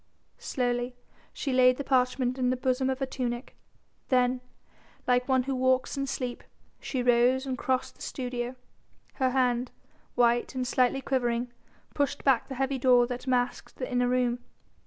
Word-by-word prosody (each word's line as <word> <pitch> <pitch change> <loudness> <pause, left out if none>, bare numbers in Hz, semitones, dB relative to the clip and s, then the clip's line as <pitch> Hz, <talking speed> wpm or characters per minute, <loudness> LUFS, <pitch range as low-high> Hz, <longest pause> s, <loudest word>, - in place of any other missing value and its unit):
Slowly 245 -1 -1 0.4
she 275 - -3
laid 255 0 +5
the 280 - -3
parchment 255 -1 +1
in 250 -1 +2
the 255 - 0
bosom 260 +1 0
of 265 - 0
her 270 - -1
tunic, 245 -1 -4 0.5
then, 250 -1 +2 0.6
like 250 0 +2
one 260 -1 +3
who 270 +1 -2
walks 260 +1 +1
in 275 0 -2
sleep, 250 -2 -4 0.4
she 255 -3 -3
rose 245 +2 +3
and 260 -1 -2
crossed 260 0 -1
the - - -20
studio, 245 -1 -4 0.7
her 260 - +4
hand 250 -1 +1 0.5
white 240 +1 +2
and 255 -1 -1
slightly 255 +2 +2
quivering 245 -2 -1 0.4
pushed 285 0 -1
back 265 -4 +3
the 265 - -6
heavy 270 +1 -1
door 250 -1 +5
that 250 +2 -6
masked 250 -1 -1
the 255 - -5
inner 245 0 +2
room. 245 -1 +1
255 Hz, 160 wpm, -28 LUFS, 245-260 Hz, 0.7 s, laid